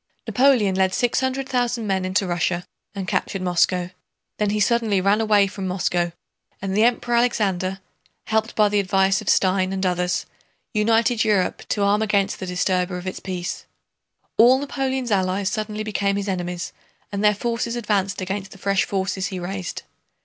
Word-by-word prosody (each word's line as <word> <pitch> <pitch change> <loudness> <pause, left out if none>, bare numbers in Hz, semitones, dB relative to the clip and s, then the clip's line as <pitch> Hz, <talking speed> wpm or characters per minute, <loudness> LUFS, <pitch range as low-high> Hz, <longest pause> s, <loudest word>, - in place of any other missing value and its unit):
Napoleon 250 -7 +3
led 190 0 +1
six 245 -1 +1
hundred 260 +1 -1
thousand 245 -3 0
men 190 -2 0
into 190 +2 +1
Russia 175 0 -1 0.3
and 195 -2 -4
captured 195 0 -1
Moscow; 180 0 +1 0.5
then 210 -1 +1
he 210 +1 0
suddenly 220 -2 +2
ran 200 +3 +2
away 210 -2 +4
from 195 -1 -5
Moscow, 175 -2 0 0.5
and 195 0 -3
the 215 - +4
Emperor 240 0 +1
Alexander, 195 -6 +1 0.5
helped 220 +1 0
by 210 -1 +5
the 205 0 +1
advice 195 +1 +2
of 215 - -3
Stein 185 0 +2
and 190 0 -2
others, 180 0 0 0.5
united 225 +1 +2
Europe 205 -4 +1
to 205 - 0
arm 205 +1 +3
against 205 -2 +1
the 185 - -5
disturber 180 0 0
of 180 - -8
its 185 - -4
peace. 180 -2 -5 0.7
All 245 +3 +7
Napoleon's 265 -3 -2
allies 190 0 +1
suddenly 215 0 -3
became 200 -2 0
his 200 0 -3
enemies 180 -2 -3 0.4
and 200 0 -2
their 210 0 +5
forces 235 +2 -2
advanced 200 -4 -1
against 190 +1 -4
the - - -13
fresh 195 +1 +1
forces 190 0 -2
he 190 - -5
raised. 180 0 -5
200 Hz, 170 wpm, -22 LUFS, 185-220 Hz, 0.7 s, All